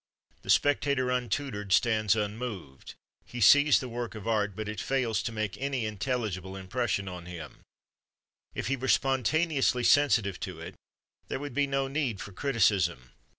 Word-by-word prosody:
The - - -14
spectator, 135 +4 +2
untutored, 125 -4 -2
stands 110 -1 +3
unmoved; 105 - -5 0.3
he 120 - -8
sees 145 +7 +6
the 130 - -5
work 120 -1 -5
of 110 0 -8
art, 105 -3 0
but 110 0 -5
it 105 -2 -4
fails 120 -6 0
to 120 - -3
make 110 -3 -4
any 135 -4 -1
intelligible 105 -4 -3
impression 100 +1 -2
on 90 -2 -7
him; 85 -5 -9 1.0
if - - -3
he 135 - 0
were 130 0 -5
spontaneously 135 0 +2
sensitive 115 -10 +3
to 90 -3 -6
it, 80 - -8 0.5
there - - -3
would 145 -1 -6
be 145 +1 +1
no 135 0 0
need 135 -7 -2
for 100 - -7
criticism. 95 - +1
115 Hz, 155 wpm, -29 LUFS, 100-135 Hz, 1.0 s, sees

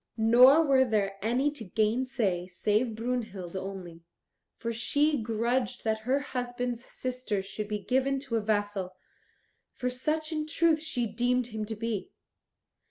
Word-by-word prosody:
Nor 250 +8 +7
were 270 -2 +5
there 200 -5 0
any 250 +7 +1
to 285 -6 -7
gainsay 215 -3 0
save 215 +5 0
Brunhild 220 -6 -3
only, 185 -3 -6 0.6
for 230 0 -3
she 285 +4 +1
grudged 235 +2 -1
that 220 -1 0
her 275 +2 +3
husband's 245 -2 -3
sister 250 -7 -3
should 205 +2 -5
be 210 0 -2
given 265 +5 +1
to 265 -5 -3
a 225 - +2
vassal, 205 -3 -1 0.8
for 250 0 -2
such 310 +5 -1
in 305 -1 -2
truth 320 0 +3
she 260 -7 -1
deemed 245 +3 +1
him 215 -1 -3
to 220 - -4
be. 220 -2 -3
235 Hz, 145 wpm, -29 LUFS, 210-260 Hz, 0.8 s, Nor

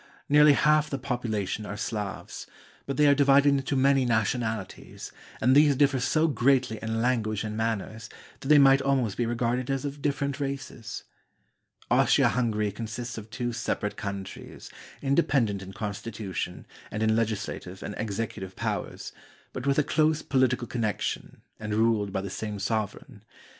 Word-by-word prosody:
Nearly 150 0 +7
half 150 +1 +3
the 140 - -2
population 115 -6 -2
are 105 0 -6
Slavs; 105 -2 -5 0.4
but 135 -1 -3
they 150 - +5
are 145 - +7
divided 140 0 +5
into 140 0 0
many 135 0 +4
nationalities, 110 -3 -2 0.3
and 130 +4 +4
these 145 -1 +6
differ 135 -1 +3
so 155 +6 +2
greatly 130 -4 +2
in 115 0 -2
language 110 -4 0
and 105 -1 -4
manners 110 0 -3 0.3
that - - -8
they 150 +1 +7
might 135 -1 +6
almost 135 -7 +1
be 120 - -1
regarded 120 +2 -1
as 135 0 -1
of 140 0 -5
different 140 -1 -1
races. 135 -4 -5 0.9
Austria - - +4
Hungary 110 -4 0
consists 115 +3 -5
of 110 +1 -12
two 120 0 -3
separate 105 -2 -2
countries, 100 -2 -7 0.3
inde 140 +4 +3
pendent 110 -8 +1
in 95 0 -8
constitution, 105 -2 -5 0.2
and 110 +1 -3
in 110 0 +3
legislative 105 -4 -3
and - - -5
executive 100 -3 -4
powers, - - -4 0.4
but 130 +2 -5
with 140 - +2
a 150 - +4
close 155 +1 +1
political 130 -3 +1
connection 110 -4 -3 0.2
and 105 -1 -3
ruled 110 -2 +2
by 95 - -2
the 100 - -5
same 105 0 -4
sovereign. 110 +3 -3
120 Hz, 155 wpm, -27 LUFS, 110-135 Hz, 0.9 s, Nearly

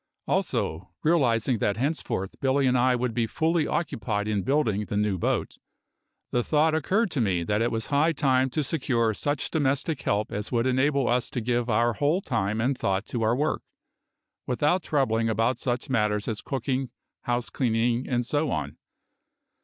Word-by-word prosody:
Also, 80 +4 -1
realising 125 -7 +2
that 100 +1 0
henceforth 130 - -2
Billy 135 +1 +2
and 130 -1 +3
I 125 +1 +3
would 125 -1 -1
be 115 -1 0
fully 160 +4 +1
occupied 110 -10 -2
in 105 -2 0
building 115 -5 +1
the 105 - -3
new 105 -3 0
boat, - - -1 0.7
the 120 - +1
thought 155 +3 +2
occurred 190 +7 +1
to 135 - 0
me 95 -6 +1
that 105 +5 0
it 120 - +1
was 115 0 -1
high 150 +3 +2
time 135 -3 +2
to 150 +4 -1
secure 125 -7 0
such 145 +6 -2
domestic 145 0 0
help 105 +1 -1
as 105 +1 -4
would 120 -1 +1
enable 130 +1 +2
us 125 0 +1
to - - -3
give 120 +1 -1
our 115 +2 +2
whole 145 - +1
time 110 - -1
and 130 +4 +1
thought 95 -2 -1
to 120 - -4
our 110 +2 +2
work 150 +4 0 0.9
without 150 +8 +1
troubling 115 -8 +1
about 115 +3 +1
such 125 0 -2
matters 105 -4 0
as 110 -3 -2
cooking, 130 0 -2 0.4
house 120 0 -1
cleaning, 120 0 0
and 120 -2 0
so 145 +4 0
on. 70 - -3
125 Hz, 175 wpm, -26 LUFS, 110-140 Hz, 0.9 s, and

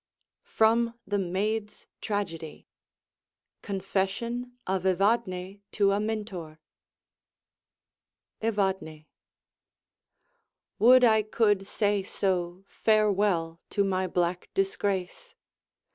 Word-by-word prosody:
FROM 230 +1 +2
'THE 205 0 -1
MAID'S 205 +4 -2 0.2
TRAGEDY' 170 -7 -4 1.0
CONFESSION 200 +5 -2
OF 190 -1 -1
EVADNE 195 0 0
TO 200 -1 +3
AMINTOR 205 -7 -4 1.8
Evadne 190 -8 -1 1.7
Would 250 +4 +7
I 220 -2 +5
could 205 -2 +1
say 205 -1 +1
so 185 -2 -2
[farewell] 200 -6 +1
to 200 - +1
my 190 -1 0
black 175 0 -1
disgrace! 195 - -2
200 Hz, 75 wpm, -28 LUFS, 185-215 Hz, 1.8 s, Would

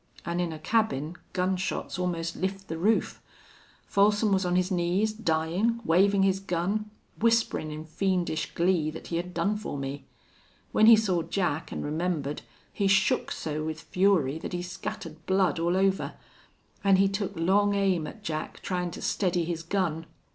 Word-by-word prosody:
An' 170 +1 -2
in 175 -2 0
a 160 - -6
cabin 165 -4 0 0.2
gun 185 +1 +1
shots 185 0 -3
almost 170 -2 -2
lift 195 +1 -3
the 165 - -3
roof. 215 +6 +1 0.6
Folsom 205 +1 +3
was 190 -1 +2
on 175 - +1
his 185 +1 +1
knees, 185 +4 +1
dyin', 195 +3 0
wavin' 195 +4 +4
his 190 0 +2
gun, 195 +3 -2 0.3
whisperin' 230 -8 +2
in 155 +1 -6
fiendish 175 -1 -1
glee 170 -3 +2
that 155 - -8
he 170 - -1
had 180 +1 -4
done 190 +5 0
for 210 -8 -5
me. 140 +1 -5 0.7
When 215 - +5
he 230 - +11
saw 195 -6 +1
Jack 165 -2 -2
an' - - -4
remembered 150 -2 -2 0.3
he 200 - +1
shook 195 0 +2
so 155 0 -3
with 160 0 -4
fury 175 -7 +2
that - - -6
he 175 0 -2
scattered 165 -3 -7
blood 190 -2 +2
all 170 +2 +1
over. 195 0 +1 0.7
An' 195 -1 +5
he 195 +1 +4
took 200 0 -2
long 200 +5 +3
aim 190 -6 +1
at 215 - -10
Jack, 155 -5 -4
tryin' 180 -1 -1
to - - -8
steady 180 -3 +1
his 165 -1 -3
gun. 165 -2 -1
180 Hz, 170 wpm, -28 LUFS, 165-195 Hz, 0.7 s, he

